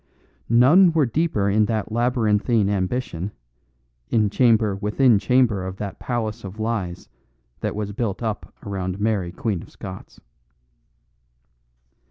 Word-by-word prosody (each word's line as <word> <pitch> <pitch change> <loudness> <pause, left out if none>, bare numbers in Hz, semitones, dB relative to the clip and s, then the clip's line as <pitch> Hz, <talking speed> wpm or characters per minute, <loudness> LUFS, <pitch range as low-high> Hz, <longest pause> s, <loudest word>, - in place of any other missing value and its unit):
None 155 - +6
were 155 -3 +3
deeper 120 -5 0
in 105 +2 +3
that 110 -1 -2
labyrinthine 115 -3 +1
ambition, 95 -1 -2 0.8
in 105 -3 +2
chamber 110 -4 +3
within 105 +3 +3
chamber 110 -2 +2
of 95 0 -6
that 100 -1 -6
palace 115 -2 -3
of 100 +2 -8
lies 110 -6 -3 0.5
that - - -3
was 105 -1 -3
built 105 0 -3
up 110 -2 -4
around 95 -1 -3
Mary 105 -5 0
Queen 100 -2 -2
of - - -13
Scots. 95 -3 -10
105 Hz, 125 wpm, -23 LUFS, 100-120 Hz, 0.8 s, None